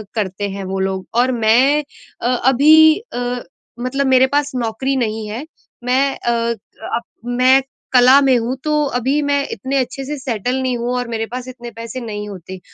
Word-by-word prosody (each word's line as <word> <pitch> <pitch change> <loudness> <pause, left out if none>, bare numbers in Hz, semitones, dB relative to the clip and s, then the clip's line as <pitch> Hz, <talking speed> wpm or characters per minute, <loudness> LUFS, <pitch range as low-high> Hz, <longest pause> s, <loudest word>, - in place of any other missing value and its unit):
करते 205 -1 -2
हैं 195 0 -6
वो 190 +1 -3
लोग। 190 0 -2
और 255 +1 +3
मैं 250 +6 +3 0.4
अ, - - 0
अभी 290 +6 +5 0.2
अ, 245 0 -2 0.4
मतलब 275 +3 -1
मेरे 260 0 +5
पास 290 +1 0
नौकरी 250 +3 -1
नहीं 220 -3 -2
है, 240 +8 -5 0.4
मैं 265 +3 +1
अ, 240 - -1 0.6
अप 235 - -1 0.2
मैं 255 +2 +4 0.3
कला 255 +2 +7
में 265 -3 +4
हूँ 235 +3 -2
तो 300 -1 +1
अभी 265 +5 0
मैं 285 -1 +1
इतने 270 +1 -2
अच्छे 270 +1 -2
से 295 +2 -4
सेटल 250 -2 -2
नहीं 255 -2 -1
हूँ 240 +1 -2
और 245 -1 -2
मेरे 225 -1 -2
पास 250 0 -5
इतने 240 -2 -9
पैसे 230 +3 -7
नहीं 210 -2 -5
होते। 185 -1 -9
250 Hz, 180 wpm, -18 LUFS, 230-270 Hz, 0.6 s, कला